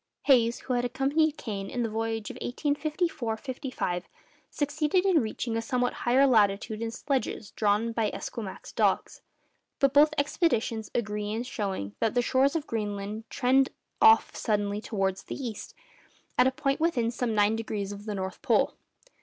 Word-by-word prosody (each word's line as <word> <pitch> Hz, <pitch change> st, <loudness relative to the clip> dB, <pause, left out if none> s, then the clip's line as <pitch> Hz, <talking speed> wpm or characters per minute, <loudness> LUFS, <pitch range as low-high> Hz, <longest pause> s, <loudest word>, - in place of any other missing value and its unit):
Hayes, 240 Hz, -4 st, +4 dB
who 255 Hz, -, -3 dB
had 245 Hz, 0 st, +1 dB
accompanied 285 Hz, +5 st, +1 dB
Kane 195 Hz, -3 st, -5 dB
in 245 Hz, -, -2 dB
the -, -, 0 dB
voyage 225 Hz, 0 st, -3 dB
of 255 Hz, -, -10 dB
1854 290 Hz, -2 st, -1 dB, 0.3 s
5, 175 Hz, -7 st, -2 dB, 0.4 s
succeeded 305 Hz, +5 st, 0 dB
in 370 Hz, -5 st, +4 dB
reaching 225 Hz, +1 st, -3 dB
a 230 Hz, -, 0 dB
somewhat 245 Hz, +1 st, 0 dB, 0.2 s
higher 265 Hz, +3 st, +6 dB
latitude 215 Hz, -3 st, +2 dB
in 230 Hz, -, -1 dB
sledges 250 Hz, -3 st, -2 dB
drawn 215 Hz, +2 st, +1 dB
by 225 Hz, -2 st, 0 dB
Esquimaux 210 Hz, -5 st, -6 dB
dogs. -, -, +1 dB, 0.6 s
But 275 Hz, -1 st, +3 dB
both 300 Hz, +1 st, +5 dB
expeditions 240 Hz, -, 0 dB
agree 210 Hz, -2 st, -2 dB
in 225 Hz, +2 st, -2 dB
showing 195 Hz, -, -4 dB
that 225 Hz, 0 st, 0 dB
the 245 Hz, -, +3 dB
shores 270 Hz, +5 st, +2 dB
of 315 Hz, -3 st, -1 dB
Greenland 210 Hz, -1 st, -4 dB
trend 265 Hz, +2 st, +3 dB, 0.3 s
off 445 Hz, 0 st, +6 dB
suddenly 205 Hz, -1 st, -1 dB
towards 195 Hz, -3 st, -1 dB
the -, -, -5 dB
east 240 Hz, -6 st, -6 dB, 0.6 s
at 250 Hz, -, +5 dB
a -, -, +2 dB
point 275 Hz, 0 st, -1 dB
within 265 Hz, -9 st, +1 dB
some 240 Hz, -2 st, -2 dB
nine 210 Hz, +1 st, +3 dB
degrees 215 Hz, -3 st, -3 dB
of 205 Hz, 0 st, -8 dB
the 210 Hz, -2 st, -3 dB
North 190 Hz, -1 st, -5 dB
Pole. -, -, +2 dB
230 Hz, 160 wpm, -28 LUFS, 210-270 Hz, 0.6 s, higher